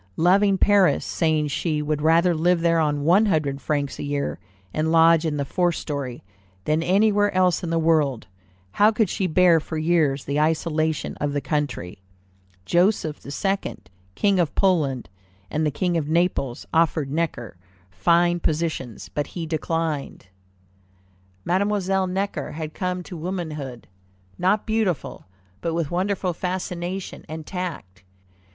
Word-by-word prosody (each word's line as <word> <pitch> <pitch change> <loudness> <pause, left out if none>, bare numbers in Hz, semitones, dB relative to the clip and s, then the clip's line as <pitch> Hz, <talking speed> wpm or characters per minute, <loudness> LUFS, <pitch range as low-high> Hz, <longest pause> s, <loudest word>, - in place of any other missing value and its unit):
Loving 195 +3 +4
Paris, 200 -2 +3
saying 155 -3 0
she 155 +2 -1
would 150 0 -1
rather 165 +3 +4
live 170 +2 +2
there 165 0 +3
on 145 -2 0
"one 190 +8 +4
hundred 145 -6 0
francs 145 -2 -2
a - - -3
year, 145 0 -2 0.3
and 155 +1 0
lodge 165 0 +5
in 150 -1 -2
the 140 - -1
fourth 175 +3 0
story," 140 -5 -5 0.4
than 155 +1 +1
anywhere 205 +3 +3
else 185 -2 +2
in 170 - -3
the 165 - +1
world, 155 -7 +2 0.5
how 205 - +5
could 215 -3 +1
she 190 - -1
bear 175 0 +5
for 160 +1 -6
years 155 -4 +1
the 140 +1 -1
isolation 155 0 0
of 145 -1 -2
the 145 - 0
country? 140 - -3 0.7
Joseph 175 -4 +1
II., 195 +7 -2 0.4
King 200 -2 +2
of 165 -4 0
Poland, 150 - +1 0.4
and 155 +1 0
the - - +2
King 175 +4 -1
of 150 -2 -2
Naples, 160 -7 0
offered 160 -4 +2
Necker 145 - -2 0.4
fine 175 - +2
positions, 155 -8 -2
but 145 - -3
he 170 -2 -5
declined. 160 - -3 1.2
Mademoiselle 190 0 +1
Necker 185 -5 -3
had 155 0 -5
come 180 -1 -3
to 180 - -9
womanhood, 155 -8 -5 0.5
not 190 +4 +2
beautiful, 215 - -2 0.3
but 165 -1 -2
with 165 -3 -2
wonderful 185 0 -1
fascination 180 +1 -4
and 155 0 -6
tact. 155 - -6
165 Hz, 145 wpm, -23 LUFS, 150-180 Hz, 1.2 s, lodge